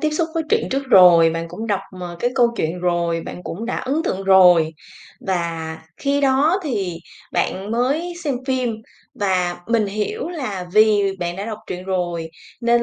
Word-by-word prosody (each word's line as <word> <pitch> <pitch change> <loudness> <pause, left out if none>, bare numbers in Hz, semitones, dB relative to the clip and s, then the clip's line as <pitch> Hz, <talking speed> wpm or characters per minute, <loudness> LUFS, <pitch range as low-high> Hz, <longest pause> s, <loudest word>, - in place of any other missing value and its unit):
tiếp 310 - +1
xúc 320 +2 -1
với 330 - 0
truyện - - +1
trước 270 +1 0
rồi, 175 -4 +7
bạn 165 +1 -4
cũng 210 +7 -6
đọc, 205 -3 0 0.2
ờ, 175 -1 -6
cái 245 - +1
câu 245 -3 +4
chuyện 165 0 -2
rồi, 170 -2 0
bạn 180 - -8
cũng 220 +7 -6
đã 245 - -2
ấn 280 +5 -1
tượng 190 - -2
rồi. 180 -4 +6 0.6
Và 165 -3 -2 0.2
khi 280 0 0
đó 285 +7 +3
thì 200 - -2 0.3
bạn 195 +3 -1
mới 275 +9 0
xem 285 -3 0
phim 255 -3 0 0.5
và 180 -3 0
mình 230 -2 +2
hiểu 215 - -3
là 230 - -4
vì 215 0 +5 0.2
bạn 175 0 -3
đã 195 - -4
đọc 215 -2 -5
truyện 180 0 -6
rồi, 175 -3 -2 0.3
nên 235 0 +3
200 Hz, 185 wpm, -20 LUFS, 175-255 Hz, 0.6 s, rồi